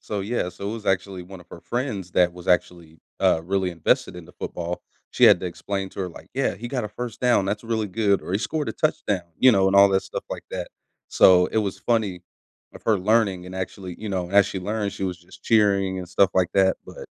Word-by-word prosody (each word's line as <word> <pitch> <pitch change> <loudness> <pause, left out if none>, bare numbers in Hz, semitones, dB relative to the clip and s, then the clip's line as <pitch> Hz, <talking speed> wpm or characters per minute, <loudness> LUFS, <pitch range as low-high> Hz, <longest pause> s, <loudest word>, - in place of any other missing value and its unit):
So, 105 -2 -4
yeah 100 -2 -2
so, 95 +3 -6
it - - -4
was 110 -2 -7
actually 95 -1 -1
one 95 +1 -11
of 90 - -17
her 85 - -10
friends 105 -8 -4
that 90 -1 +3
was 90 +1 -11
actually, 85 -3 0 0.2
uh, 80 - +3
really 95 0 0
invested 85 +1 0
into 90 0 -11
football. 85 0 -5 0.3
She - - +3
had - - +7
to - - -3
explain 95 +2 -4
to - - -7
her, 95 - -2
like, 85 - -14
"Yeah, 135 +1 0
he 120 - -7
got 125 -3 -2
a - - -4
1st 115 +2 -7
down, 125 -5 +3
that's 100 +3 -3
really 110 -2 -1
good," 100 0 +1
or, - - -6
"he 100 - +2
scored 150 +6 -2
a - - -2
touchdown," 95 - -1
you 130 - +7
know, 95 -3 +3
and 95 +1 +3
all 100 0 +8
that 95 0 +2
stuff - - -6
like - - -6
that. - - -4 0.4
So, 90 -1 +6
it 110 - -1
was 100 -3 -2
funny 105 -7 -1 0.5
of - - -12
her 110 -3 +3
learning 100 -2 +1
and 90 - -9
actually 95 -1 -6
you 110 - -6
know, 90 -3 -3
as 100 0 +5
she 95 - -4
learned, 105 +1 -2
she 100 - -4
was 90 -2 -3
just 85 - -17
cheering 100 -4 +2
and 90 - -7
stuff 95 +2 +3
like 90 -2 +3
that, 95 -1 +4
but - - -10
95 Hz, 245 wpm, -24 LUFS, 90-105 Hz, 0.5 s, all